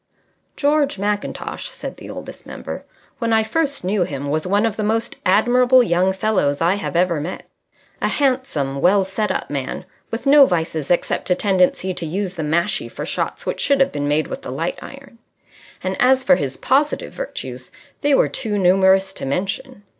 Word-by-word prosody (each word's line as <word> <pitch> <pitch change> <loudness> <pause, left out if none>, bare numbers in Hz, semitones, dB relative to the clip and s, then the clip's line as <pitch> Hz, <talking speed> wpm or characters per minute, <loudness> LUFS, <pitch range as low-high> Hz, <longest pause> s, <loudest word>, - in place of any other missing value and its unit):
George 290 -2 +1
Mackintosh 205 +1 -3
(said - - -7
the - - -10
Oldest - - -9
Member), - - -7 0.3
when 230 -1 -1
I 220 0 +4
first 280 - -1
knew 195 +2 0
him, 140 -3 -4
was 155 +3 -1
one 205 +4 +2
of 225 -2 -1
the 220 - -3
most 225 +2 -1
admirable 245 +6 +5
young 185 -2 +2
fellows 190 -8 0
I 170 +2 +3
have 200 -3 -4
ever 170 -3 +2
met. 170 +5 -6 0.6
A - - +2
handsome, 250 - 0
well 195 +2 +4
set 200 +3 -2
up - - -3
man, 140 +4 -4 0.2
with 225 +4 -5
no 280 0 +7
vices 160 -4 -2
except 175 - 0
a 180 - +4
tendency 185 -1 +2
to 170 - -5
use 190 +3 -3
the 170 - -5
mashie 170 +6 0
for - - -6
shots - - -3
which - - -3
should 280 -1 +2
have 270 - +3
been 145 0 -2
made 150 +2 +2
with - - -6
the - - -7
light 165 +7 -3
iron. 275 -4 -12 0.6
And 185 0 -1
as 260 +1 +4
for 270 +1 +5
his 135 - -3
positive 290 +3 +1
virtues, - - -6 0.3
they 290 -1 +3
were - - +4
too 220 -6 -2
numerous 190 +1 +4
to - - -6
mention. 195 +6 -3
195 Hz, 185 wpm, -20 LUFS, 170-250 Hz, 0.6 s, no